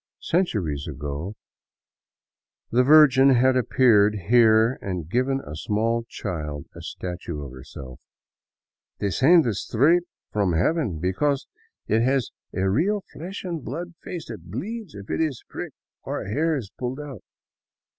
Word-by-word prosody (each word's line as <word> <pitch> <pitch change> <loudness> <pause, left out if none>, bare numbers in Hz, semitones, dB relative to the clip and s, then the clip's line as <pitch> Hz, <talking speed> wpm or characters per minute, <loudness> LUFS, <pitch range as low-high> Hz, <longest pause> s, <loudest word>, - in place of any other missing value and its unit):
Centuries 100 - -1
ago 75 +7 -5 1.4
the 120 - +4
Virgin 135 -2 +7
had 130 +2 +4
appeared 110 -4 +4
here 115 0 +5
and 90 -5 -4
given 130 +7 +1
a 75 - -8
small 115 +7 0
child 75 -7 -5
a - - -9
statue 85 -4 -6
of 70 - -8
herself 65 0 -10 0.4
— - - -70
" - - -62
descended 130 - +4
straight 140 - +3 0.3
from 100 -4 +1
heaven, 105 - +1
because 115 - 0 0.4
it 110 +1 +2
has 130 0 +1 0.2
a 95 +1 0
real 185 - +1
flesh 185 +5 -7
and 170 -6 -4
blood 175 +1 -5
face 175 -3 -7
that 90 -7 -9
bleeds 200 - -5
if 100 0 -9
it - - 0
is 150 -7 -1
'pricked, - - -7 0.3
or - - -4
if 100 - -6
hair 160 +6 +1
is 105 -7 -7
pulled 125 +2 -3
out." 140 -8 -8
115 Hz, 145 wpm, -24 LUFS, 95-145 Hz, 1.4 s, Virgin